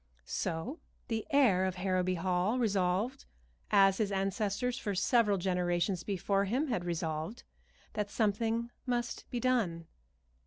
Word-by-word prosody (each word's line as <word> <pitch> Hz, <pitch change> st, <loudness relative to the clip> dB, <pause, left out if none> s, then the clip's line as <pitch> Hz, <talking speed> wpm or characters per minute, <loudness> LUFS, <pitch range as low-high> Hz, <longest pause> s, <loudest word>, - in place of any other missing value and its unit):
So 190 Hz, -, -3 dB, 0.3 s
the 225 Hz, -2 st, -2 dB
heir 250 Hz, -11 st, +4 dB
of 185 Hz, -1 st, -1 dB
Harrowby 185 Hz, 0 st, 0 dB
Hall 185 Hz, +6 st, +1 dB
resolved, 205 Hz, +2 st, 0 dB, 0.4 s
as 195 Hz, -2 st, +5 dB
his 210 Hz, -2 st, +1 dB
ancestors 200 Hz, +5 st, 0 dB
for 205 Hz, -3 st, -2 dB
several 210 Hz, +1 st, +3 dB
generations 180 Hz, 0 st, 0 dB
before 195 Hz, 0 st, 0 dB
him 260 Hz, +9 st, 0 dB
had 180 Hz, -8 st, -1 dB
resolved, 165 Hz, +4 st, -3 dB, 0.5 s
that 210 Hz, -2 st, -2 dB
something 225 Hz, +2 st, 0 dB, 0.2 s
must 240 Hz, -1 st, -2 dB
be 245 Hz, -, -2 dB
done. 225 Hz, -10 st, +1 dB
200 Hz, 125 wpm, -32 LUFS, 180-235 Hz, 0.5 s, as